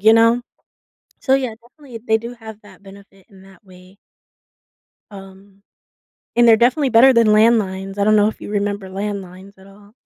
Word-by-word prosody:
you 220 +2 +4
know? 230 +2 +3 0.8
So, 265 - +1
yeah, 255 -4 -2
definitely, 250 -1 -14
they 220 0 +1
do 235 +2 -9
have 220 -2 -13
that 200 -2 -19
benefit 195 -1 -18
in 190 -2 -19
that 195 +2 -20
way 185 0 -19 1.2
um, 195 0 -15 0.7
and 240 0 +3
they're 225 - +6
definitely 255 +5 +1
better 250 +3 +5
than 230 -2 +3
landlines, 210 -3 +1
I 200 - 0
don't 215 +1 +2
know 210 0 +3
if 215 - -6
you - - -10
remember 205 -1 -3
landlines 195 -1 -8
at 190 0 -19
all. 205 +1 -20
205 Hz, 175 wpm, -18 LUFS, 195-230 Hz, 1.2 s, they're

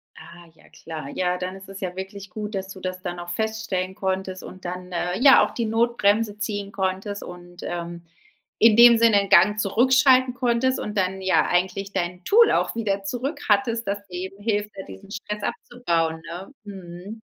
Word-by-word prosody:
Ah, 170 0 -14
ja - - -22
klar. 155 -3 -8
Ja, 180 +3 -1
dann 185 +1 -5
ist 195 0 -12
es 195 0 -9
ja 185 -3 -4
wirklich 195 +1 -7
gut, 210 +2 -6
dass 190 0 -4
du 195 - -9
das 185 0 -5
dann 175 -2 -5
noch 175 0 -7
feststellen 200 -2 -2
konntest 190 -1 -3
und 185 0 -11
dann, 180 +1 -6
äh 180 +2 -2
ja, 270 +1 +7
auch - - -7
die 235 - -2
Notbremse 225 -2 +1
ziehen 205 -1 -3
konntest 195 +1 -3
und, 175 0 -11
ähm, 170 0 -5 0.6
in 220 -1 +6
dem 235 0 +8
Sinne 225 -2 +5
'n 200 - -5
Gang 210 +5 +5
zurückschalten 255 +4 +4
konntest 250 +1 +1
und 210 0 -5
dann, 190 0 0
ja, 190 0 +3
eigentlich 190 +2 -1
dein 180 +1 -3
Tool 455 - +5
auch - - +1
wieder 200 -4 -1
zurück 250 +9 -3
hattest, 230 +2 +1
das 200 0 -3
dir 180 - -10 0.2
eben 195 - -18
hilft, 210 -1 -1
da 195 - -6
diesen 95 - -12
Stress 210 0 -5
abzubauen, 165 -12 -2
ne? 175 +6 -8
Mhm. 195 +2 -9
195 Hz, 190 wpm, -24 LUFS, 180-220 Hz, 0.6 s, dem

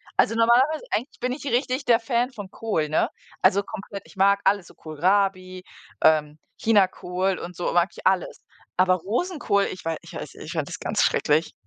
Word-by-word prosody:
also 225 - +3
normalerweise 245 +7 +3
eigentlich 245 +7 -3
bin 250 +1 -1
ich 275 - -5
richtig 255 +1 0
der 235 -2 +5
Fan 240 +2 0
von 205 -5 -9
Kohl, 185 -9 -1
ne, 155 - +1 0.3
also 200 +2 +4
komplett, 200 -1 -8
ich - - -17
mag 200 +1 +3
alles 195 -2 +2
so - - -17
Kohlrabi, 185 +3 0 0.4
ähm, 155 -1 +3 0.2
Chinakohl 190 -3 +1
und 180 +1 -8
so 175 - -2
mag 175 +1 +3
ich - - -13
alles, 190 -2 +1 0.3
aber 185 0 +4
Rosenkohl, 210 - 0
ich 185 - -9
wei 165 -1 -1
ich - - -13
weiß - - -7
ich - - -9
fand - - -2
das - - -5
ganz - - -1
schrecklich. 155 +2 +2
195 Hz, 185 wpm, -24 LUFS, 180-230 Hz, 0.4 s, der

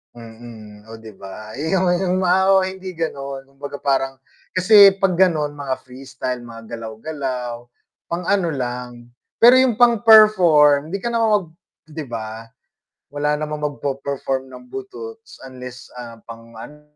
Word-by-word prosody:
Mm, 110 -2 -13
oh 115 - -9
'di 110 -1 -12
ba? 110 +3 -10
yung 170 +6 0 0.2
yung 185 0 0
mga 185 0 +2
oo 190 -1 +4
hindi 190 -2 -7
ganon, 140 -4 -5
kumbaga 140 +1 -9
parang, 135 -1 -1 0.4
kasi 195 +1 +7
'pag 195 -1 +1
ganon 165 -5 +2
mga 140 -2 -4
freestyle 130 -1 -6
mga 115 -1 -11
galaw-galaw, 120 +1 -6 0.4
pang 170 +1 -4
ano 195 -3 +1
lang. 125 -3 -5 0.3
Pero 240 +2 +7
yung 250 -5 +1
pang-perform 210 - +5
'di 195 - -3
ka 235 +4 -4
naman 230 -1 +2 0.2
mag - - -20 0.4
'di 155 0 -7
ba, 110 -1 -6 0.7
wala 150 +1 0
namang 150 0 -5 0.2
magpo-perform 135 -1 -3
ng 130 - -12
buduts, 450 +3 -9
unless, 125 -2 -11
ah, 115 -1 -10
pang 115 0 -12
ano 150 +6 -11
140 Hz, 140 wpm, -20 LUFS, 120-185 Hz, 0.7 s, kasi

